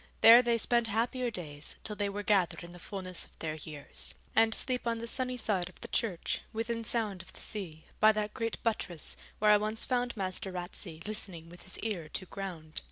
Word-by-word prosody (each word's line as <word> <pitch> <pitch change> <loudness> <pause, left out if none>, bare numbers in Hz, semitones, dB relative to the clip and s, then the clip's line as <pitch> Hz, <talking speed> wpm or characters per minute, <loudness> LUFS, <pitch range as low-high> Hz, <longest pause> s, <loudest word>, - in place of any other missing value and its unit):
There 230 +2 +11
they 235 -1 +2
spent 235 +1 +3
happier 240 +3 0
days, 150 -8 -5
till 210 - -5
they 205 -1 0
were 205 +1 -4
gathered 180 -5 +2
in 170 - -9
the 175 - -11
fullness 185 -1 -4
of - - -13
their 155 -1 -3
years; 155 -2 -5 0.2
and 225 0 +6
sleep 250 +1 0
on 230 0 +1
the 230 - -4
sunny 255 +1 -1
side 190 -6 0
of 180 - -16
the - - -5
church, 200 -8 0
within 230 0 -2
sound 215 -4 +2
of 185 - -11
the - - -11
sea, 175 -7 -5
by 215 - +8
that 210 0 -2
great 230 -1 -2
buttress 195 -8 +1 0.2
where 210 0 +5
I 210 - +8
once 215 +2 0
found 245 -2 0
Master 190 +1 -2
Ratsey 175 -2 -6
listening 190 -6 -4
with 175 +1 -12
his 190 - -3
ear 185 -9 -3
to 190 - -2
ground. 175 -5 -5
205 Hz, 210 wpm, -32 LUFS, 175-230 Hz, 0.2 s, There